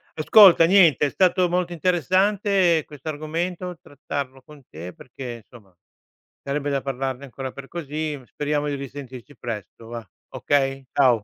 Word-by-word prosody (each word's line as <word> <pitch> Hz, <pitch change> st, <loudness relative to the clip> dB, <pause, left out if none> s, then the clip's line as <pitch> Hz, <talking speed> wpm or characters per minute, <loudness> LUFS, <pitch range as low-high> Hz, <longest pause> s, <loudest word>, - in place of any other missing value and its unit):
Ascolta, 175 Hz, +1 st, +7 dB
niente, 170 Hz, -6 st, +5 dB
è -, -, -3 dB
stato 185 Hz, -1 st, +3 dB
molto 175 Hz, 0 st, -1 dB
interessante 185 Hz, 0 st, +2 dB
questo 145 Hz, 0 st, -12 dB
argomento, 170 Hz, +4 st, -4 dB
trattarlo 140 Hz, -1 st, -6 dB
con 145 Hz, +1 st, -16 dB
te 85 Hz, +3 st, -8 dB
perché, 120 Hz, -2 st, -9 dB
insomma, 110 Hz, -6 st, -17 dB, 0.7 s
sarebbe 140 Hz, +1 st, -2 dB
da 140 Hz, -1 st, 0 dB
parlarne 135 Hz, 0 st, -4 dB
ancora 135 Hz, 0 st, -7 dB
per 135 Hz, +1 st, -10 dB
così 155 Hz, -2 st, -4 dB
speriamo 145 Hz, +2 st, -2 dB
di 145 Hz, -, -2 dB
risentirci 135 Hz, -1 st, -9 dB
presto 115 Hz, -1 st, -7 dB
và, 115 Hz, -4 st, -8 dB, 0.2 s
okay? 135 Hz, -1 st, 0 dB
Ciao. 125 Hz, -6 st, +3 dB
145 Hz, 140 wpm, -23 LUFS, 130-170 Hz, 0.7 s, Ascolta